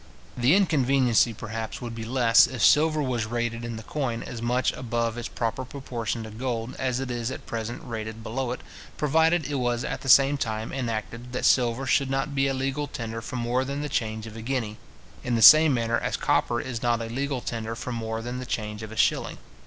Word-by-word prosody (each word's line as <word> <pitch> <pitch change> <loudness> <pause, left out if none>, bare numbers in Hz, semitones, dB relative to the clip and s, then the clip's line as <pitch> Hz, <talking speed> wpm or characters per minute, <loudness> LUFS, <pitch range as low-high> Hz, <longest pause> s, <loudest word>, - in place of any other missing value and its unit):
The 125 +7 +4
inconveniency, 135 - +3
perhaps, 115 0 -6
would 120 -2 -6
be 115 -1 -6
less, 120 -1 +5
if 120 -4 -3
silver 155 0 +4
was 120 -4 -1
rated 120 0 -2
in 120 -1 -4
the 110 - -7
coin 120 -3 -3
as 120 -2 -7
much 125 +2 +1
above 115 -2 -2
its 120 - -4
proper 115 +2 -3
proportion 120 -4 -4
to 110 - -8
gold 115 +1 -3
as 130 -1 0
it 135 -2 -4
is 120 -1 -2
at 130 - -7
present 115 +1 -5
rated 110 -2 -6
below 125 +3 -3
it, 125 - -5 0.4
provided 160 +3 +2
it 145 - -4
was 120 0 0
at - - -4
the 135 - -5
same 140 +2 +6
time 110 -2 -3
enacted, 115 -1 -4
that 125 - -1
silver 125 +1 +3
should 135 0 +2
not 135 +2 -1
be 135 0 +2
a 135 - 0
legal 135 +2 -2
tender 115 -4 -5
for 120 - -7
more 120 +1 0
than 140 +2 -4
the 150 - -3
change 110 -4 -2
of 110 -1 -9
a 115 - -7
guinea, 115 -3 -2 0.5
in 120 -1 0
the 115 - +1
same 155 0 +10
manner 115 -2 +1
as - - -2
copper 120 - +1
is 120 -2 -5
not 120 -1 +1
a 115 - -4
legal 135 +3 -2
tender 115 -1 -4
for 125 - -5
more 115 -1 -3
than 120 +1 -4
the 130 - -6
change 105 -2 -3
of 110 0 -7
a - - -8
shilling. - - +1
120 Hz, 220 wpm, -26 LUFS, 115-135 Hz, 0.5 s, same